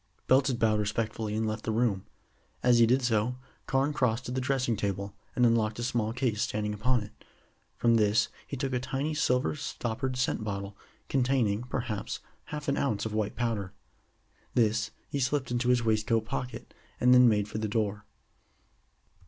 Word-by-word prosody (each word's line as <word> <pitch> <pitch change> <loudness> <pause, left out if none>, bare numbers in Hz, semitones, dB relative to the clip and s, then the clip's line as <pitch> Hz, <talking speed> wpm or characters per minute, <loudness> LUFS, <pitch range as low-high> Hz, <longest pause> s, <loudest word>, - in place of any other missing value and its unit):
Belton 130 0 +4
bowed 110 -2 +2
respectfully 110 0 -2
and 110 0 0
left 110 0 -3
the 110 - -1
room. 110 -4 0 0.6
As 125 -1 +5
he 115 - +6
did 130 +3 +3
so, 115 +1 +1 0.3
Carne 135 +2 +1
crossed 125 -2 0
to - - -4
the 130 +1 -1
dressing 130 -3 +1
table, 100 -1 -3 0.2
and 125 - +4
unlocked 110 -2 +2
a 120 - -3
small 115 -2 0
case 115 -3 -1
standing 105 0 -1
upon 115 +2 +1
it. 105 +1 -14 0.5
From 115 -1 +4
this 105 +1 +3 0.2
he 140 - -5
took 135 0 -2
a 125 - +1
tiny 135 +4 -2
silver 125 -3 +1
stoppered 130 -2 -3
scent 125 -3 0
bottle, 100 -1 -4 0.3
containing, 125 -6 +1
perhaps, 120 -5 -3 0.3
half 150 -1 -6
an 140 0 +1
ounce 110 -7 0
of 110 - -3
white 105 -1 -1
powder. 110 -5 -2 0.8
This 110 -2 +2 0.2
he 140 - -3
slipped 130 -1 0
into 120 0 +1
his 125 -1 +3
waistcoat 110 0 +2
pocket, 125 +1 -5 0.3
and 125 0 +5
then 125 -1 +8
made 105 -2 +1
for 105 - -4
the 110 - -1
door. 105 -1 -2
115 Hz, 175 wpm, -29 LUFS, 110-125 Hz, 0.8 s, then